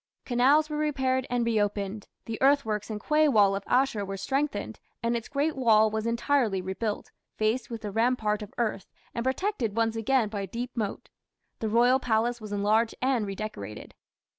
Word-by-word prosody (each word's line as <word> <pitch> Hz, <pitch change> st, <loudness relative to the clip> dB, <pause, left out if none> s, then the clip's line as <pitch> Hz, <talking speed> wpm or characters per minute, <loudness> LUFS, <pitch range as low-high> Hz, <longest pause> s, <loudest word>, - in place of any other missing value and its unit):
Canals 270 Hz, +5 st, +4 dB
were 300 Hz, -1 st, -4 dB
repaired 265 Hz, -3 st, 0 dB
and 245 Hz, -1 st, 0 dB
reopened; 205 Hz, -2 st, -1 dB, 0.2 s
the 225 Hz, -1 st, -5 dB
earthworks 230 Hz, -7 st, +2 dB
and 215 Hz, -1 st, -4 dB
quay 305 Hz, +7 st, +3 dB
wall 205 Hz, -7 st, +4 dB
of 195 Hz, -, -3 dB
Ashur 250 Hz, -5 st, +2 dB
were 195 Hz, 0 st, -5 dB
strengthened, 280 Hz, +8 st, -2 dB, 0.2 s
and 235 Hz, +1 st, +1 dB
its 230 Hz, -2 st, -4 dB
great 290 Hz, +2 st, 0 dB
wall 220 Hz, -4 st, +4 dB
was 220 Hz, +1 st, -2 dB
entirely 235 Hz, -3 st, +1 dB
rebuilt, 190 Hz, +3 st, -4 dB, 0.3 s
faced 220 Hz, +3 st, 0 dB
with 230 Hz, -2 st, -6 dB
a 205 Hz, -, -3 dB
rampart 225 Hz, -1 st, +1 dB
of 210 Hz, -, -8 dB
earth, 215 Hz, -5 st, -1 dB, 0.3 s
and 235 Hz, -, -2 dB
protected 260 Hz, -, -1 dB
once 225 Hz, 0 st, +1 dB
again 225 Hz, +1 st, +2 dB
by 205 Hz, -1 st, -4 dB
a 195 Hz, -, -4 dB
deep 240 Hz, +6 st, -5 dB
moat. 215 Hz, -4 st, -4 dB, 0.5 s
The 220 Hz, -, -2 dB
royal 245 Hz, +4 st, +4 dB
palace 235 Hz, 0 st, 0 dB
was 215 Hz, -1 st, -8 dB
enlarged 215 Hz, +3 st, +1 dB
and 250 Hz, -5 st, +1 dB
redecorated. 195 Hz, -, -6 dB
230 Hz, 175 wpm, -27 LUFS, 210-260 Hz, 0.5 s, Canals